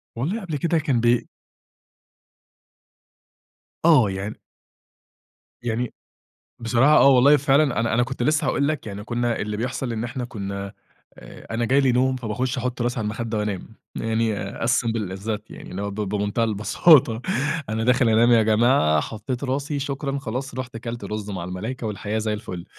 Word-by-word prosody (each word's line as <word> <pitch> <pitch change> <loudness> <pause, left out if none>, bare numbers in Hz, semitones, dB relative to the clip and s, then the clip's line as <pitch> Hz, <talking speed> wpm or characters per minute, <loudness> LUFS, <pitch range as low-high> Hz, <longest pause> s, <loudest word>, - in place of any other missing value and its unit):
والله 165 - -2
قبل 165 -7 -4
كده 170 +3 +1
كان 140 -6 +1
بي 120 0 +2 2.6
آه، 140 -11 +6
يعني 95 +3 -5 1.2
يعني، 120 +1 -2 0.7
بصراحة 120 +6 +4
آه - - +7
والله 140 +2 +6
فعلًا، 140 -3 +2
أنا 115 -1 0
أنا 120 - +3
كنت 125 0 -3
لسّه 155 +4 +2
هاقول 140 - +1
لَك 155 -6 -3
يعني 105 0 -6
كنّا 120 +1 -1
اللي 105 0 -3
بيحصل 125 +1 -3
إن 110 +1 -3
إحنا 120 +1 -4
كنّا 100 -4 -5 0.5
آآ - - -10
أنا 120 +1 0
جايلي 135 +1 +3
نوم 130 +1 +2
فباخش 125 +2 -2
أحط 125 0 -2
راسي 120 +1 -1
عالمخده 110 +1 -3
وأنام، 105 -3 -3 0.3
يعني 110 -3 -1
As - - 0
simple 115 -6 0
as - - -14
that 110 -1 -1
يعني، - - -10
اللي 95 +2 -5
هو 100 - -3
ب - - -8
بمنتهى 105 +2 -1
البساطة 115 - +4 0.5
أنا 110 +1 -1
داخل 125 -1 +3
أنام 115 +2 +4
يا 115 -2 +6
جماعة، 110 - +3
حَطِّيت 120 - -5
راسي، 140 +2 -2
شكرًا 140 0 -3
خلاص، 130 0 -5
رُحت 130 -1 -6
أكلت 115 -1 -6
رز 105 0 -5
مع 95 -4 -4
الملايكة 110 +7 -5
والحياة 105 +1 -3
زي 110 0 -1
الفل. 105 -5 -6
115 Hz, 165 wpm, -23 LUFS, 105-130 Hz, 2.6 s, آه